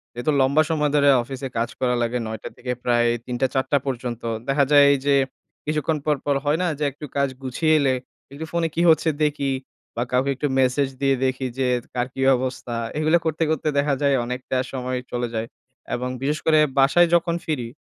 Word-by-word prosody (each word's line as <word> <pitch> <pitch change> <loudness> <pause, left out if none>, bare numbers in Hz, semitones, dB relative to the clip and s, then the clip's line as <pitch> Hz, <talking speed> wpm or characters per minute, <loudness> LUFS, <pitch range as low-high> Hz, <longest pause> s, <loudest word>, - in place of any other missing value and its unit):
যেহেতু 120 +5 0
লম্বা 140 +4 +4
সময় 150 -2 +1
ধরে 140 -1 +5
অফিসে 135 +1 -6
কাজ 115 +1 0
করা 125 -1 +1
লাগে, 120 +1 0
৯ 110 0 -4
টা - - -5
থেকে 125 0 -4
প্রায় 120 -1 +2 0.2
৩ 125 - -4
টা 130 - +4
৪ 130 - +2
টা 145 - +5
পর্যন্ত। 120 -3 -4 0.3
দেখা 140 +1 +3
যায় 145 -1 +8
এই 140 - +3
যে, 140 -1 +4 0.5
কিছুক্ষণ 155 +1 0
পর, 150 -1 +3
পর 145 -1 +2
হয় 150 +2 +2
না? 180 - +1
যে - - -1
একটু 150 +3 -9
কাজ 140 -1 +2
গুছিয়ে 155 +5 +1
এলে, 135 -2 +2 0.4
একটু 155 +3 -6
ফোনে 170 -1 0
কি 170 - +1
হচ্ছে 160 +1 +4
দেখি 145 -2 0 0.4
বা 120 - 0
কাউকে 130 +2 +1
একটু 145 - -1
ম্যাসেজ 130 +1 +2
দিয়ে 135 -1 +3
দেখি 130 0 -1
যে 125 -2 0
কার 125 0 0
কি 135 - -5 0.2
অবস্থা? 125 -2 -4 0.2
এগুলা 155 +2 +3
করতে, 160 0 0
করতে 155 0 -1
দেখা 140 0 +2
যায় 140 -1 +3
অনেকটা 125 +1 -3
সময় 130 -1 -3
চলে 120 0 -1
যায়। 110 +1 -2 0.5
এবং 125 +1 -3
বিশেষ 150 +3 -1
করে 155 -1 +5 0.2
বাসায় 155 +6 +5
যখন 170 0 +1
ফিরি, 130 -7 -2
135 Hz, 205 wpm, -23 LUFS, 125-150 Hz, 0.5 s, যায়